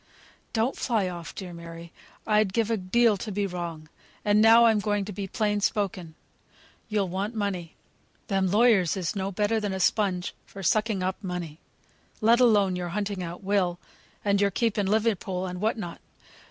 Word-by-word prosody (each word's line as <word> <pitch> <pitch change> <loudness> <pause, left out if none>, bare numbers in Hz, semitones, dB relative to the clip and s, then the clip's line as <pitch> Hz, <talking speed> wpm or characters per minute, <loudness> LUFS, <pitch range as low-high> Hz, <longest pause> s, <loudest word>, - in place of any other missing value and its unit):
"Don't 230 +4 0
fly 220 -7 0
off, 175 -3 -7
dear 180 -3 -7
Mary; 170 0 -10 0.3
I'd 210 -3 +2
give 230 0 +1
a - - +3
deal 215 +3 +3
to 210 +3 -5
be 200 +1 -1
wrong. 170 -4 -5 0.4
And 210 0 +4
now 225 +1 +7
I'm 220 -2 +4
going 205 -1 0
to 205 - -6
be 195 0 -5
plain 210 0 0
spoken. 190 -6 -1 0.7
You'll 210 -3 0
want 195 +5 -3
money. 190 -6 -3 0.5
Them 195 -2 +1
lawyers 205 -4 +4
is 180 -1 -2
no 195 0 -2
better 210 +3 +1
than 205 -2 -2
a 190 - -3
spunge 185 -1 +1 0.2
for 195 - -9
sucking 210 +1 +1
up 185 +3 -3
money; 175 -4 -5 0.6
let 230 +2 +4
alone 205 -6 +4
your 180 -1 -3
hunting 200 +1 -3
out 175 +2 -6
Will, 190 -3 +1 0.5
and 200 0 +2
your 200 - +4
keep 225 +2 0
in 200 - +1
Liverpool, 205 -3 0
and 180 0 -5
what 220 +2 +1
not. 175 -6 -6
200 Hz, 180 wpm, -27 LUFS, 180-215 Hz, 0.7 s, now